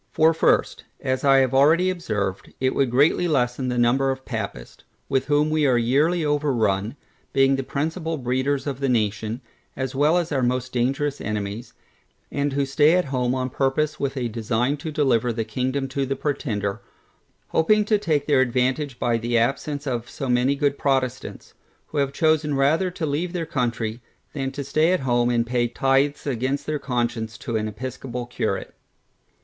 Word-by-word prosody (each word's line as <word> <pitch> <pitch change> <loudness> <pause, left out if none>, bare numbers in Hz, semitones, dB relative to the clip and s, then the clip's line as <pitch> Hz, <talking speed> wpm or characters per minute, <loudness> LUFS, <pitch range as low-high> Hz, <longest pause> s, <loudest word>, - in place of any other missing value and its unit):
For 160 +1 +4
first, 160 - +1 0.2
as 130 0 -2
I 135 -1 +6
have 130 -1 +1
already 160 +7 +4
observed, 105 - -3
it 130 0 +1
would 135 -2 +1
greatly 145 +8 +3
lessen 130 -4 0
the 125 -1 -1
number 125 +3 +3
of 130 0 -3
Papists, 100 - -6 0.2
with 135 -1 0
whom 150 +1 +2
we 155 -2 +2
are 125 -2 +3
yearly 150 +8 +2
overrun, 120 -7 0 0.4
being 135 0 +4
the 135 - -1
principal 160 +4 -3
breeders 130 +2 -1
of 140 -3 -3
the 135 -1 0
nation, 110 0 -1 0.3
as 130 0 -3
well 150 +5 +3
as 175 -2 -1
our 135 -3 +1
most 125 +1 -1
dangerous 135 +4 0
enemies, 105 +2 -4 0.6
and 145 -1 -1
who 140 0 +1
stay 150 +4 +4
at 180 - +2
home 125 0 +1
on 130 -1 -2
purpose 150 +4 0
with 140 0 -2
a 125 -2 -1
design 115 +4 -1
to 155 +3 -6
deliver 125 -5 +2
the 115 -1 -2
kingdom 130 +4 -2
to 135 0 -2
the 135 - -1
Pretender, 110 -10 -2 0.7
hoping 210 +6 +3
to 210 -1 +2
take 150 -7 0
their 140 -3 +4
advantage 130 +2 0
by 120 -1 0
the 120 +1 0
absence 140 +5 -1
of 120 -3 -3
so 135 - -5
many 125 +3 +2
good 140 0 0
Protestants, 130 -3 -2 0.4
who 150 - -2
have 140 -1 +1
chosen 155 -1 +1
rather 155 +7 +2
to 175 -2 -4
leave 160 +5 -2
their 170 -2 -2
country, 120 -6 -2 0.3
than 135 -2 -3
stay 145 +5 +1
at 185 - 0
home 120 -2 +2
and 120 -1 +1
pay 120 0 0
tithes 135 +4 +1
against 130 +1 -1
their 155 -1 -2
conscience 120 -4 -2
to 115 - -5
an 110 0 0
episcopal 125 +2 -6
curate. 120 - -3
135 Hz, 175 wpm, -23 LUFS, 120-145 Hz, 0.7 s, I